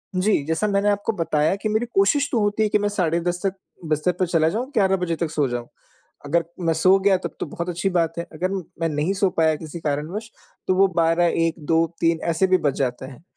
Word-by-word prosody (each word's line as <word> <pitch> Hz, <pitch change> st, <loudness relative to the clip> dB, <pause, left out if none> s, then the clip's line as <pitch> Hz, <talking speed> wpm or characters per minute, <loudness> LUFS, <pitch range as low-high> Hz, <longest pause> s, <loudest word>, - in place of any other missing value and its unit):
जी, 185 Hz, -4 st, +2 dB
जैसा 160 Hz, +7 st, 0 dB
मैंने 200 Hz, 0 st, +2 dB
आपको 205 Hz, +2 st, 0 dB
बताया 160 Hz, 0 st, +1 dB
कि 200 Hz, +2 st, -3 dB
मेरी 220 Hz, +3 st, 0 dB
कोशिश 280 Hz, +9 st, +3 dB
तो 235 Hz, -, +1 dB
होती 205 Hz, +1 st, +1 dB
है 215 Hz, -, +1 dB
कि 210 Hz, -, +3 dB
मैं 205 Hz, 0 st, 0 dB
साढ़े 170 Hz, -5 st, 0 dB
10 175 Hz, 0 st, -1 dB
तक 195 Hz, -, +1 dB, 0.4 s
बिस्तर 155 Hz, +3 st, +1 dB
पे 185 Hz, -, +3 dB
चला 165 Hz, -2 st, +2 dB
जाऊँ, 225 Hz, +8 st, -2 dB
11 195 Hz, -5 st, +3 dB
बजे 170 Hz, -2 st, -1 dB
तक 165 Hz, 0 st, -2 dB
सो 150 Hz, -3 st, +1 dB
जाऊँ। 120 Hz, -1 st, -4 dB, 0.6 s
अगर 170 Hz, +4 st, +1 dB, 0.2 s
मैं 165 Hz, -, +3 dB
सो 185 Hz, +4 st, +4 dB
गया 195 Hz, 0 st, +3 dB
तब 180 Hz, -, -7 dB
तो -, -, -2 dB
बहुत 170 Hz, +3 st, -5 dB
अच्छी 175 Hz, +3 st, -1 dB
बात 170 Hz, -3 st, 0 dB
है, 170 Hz, -, -3 dB
अगर 175 Hz, +4 st, -2 dB
म 195 Hz, -2 st, -3 dB, 0.2 s
मैं 165 Hz, -, +1 dB
नहीं 150 Hz, +5 st, 0 dB
सो 195 Hz, -1 st, +1 dB
पाया 160 Hz, -1 st, +3 dB
किसी 155 Hz, +2 st, -8 dB
कारणवश, 160 Hz, +9 st, -3 dB, 0.4 s
तो 185 Hz, -, +2 dB
वो 195 Hz, +1 st, +5 dB
12, 165 Hz, +1 st, +3 dB
1, 165 Hz, -1 st, +1 dB
2, 165 Hz, +2 st, +2 dB, 0.2 s
3, 165 Hz, -1 st, +2 dB
ऐसे 170 Hz, +3 st, +2 dB
भी 185 Hz, 0 st, +4 dB
बज 145 Hz, -5 st, 0 dB
जाते 130 Hz, -1 st, -2 dB
हैं। 135 Hz, +3 st, -12 dB
170 Hz, 240 wpm, -22 LUFS, 160-195 Hz, 0.6 s, वो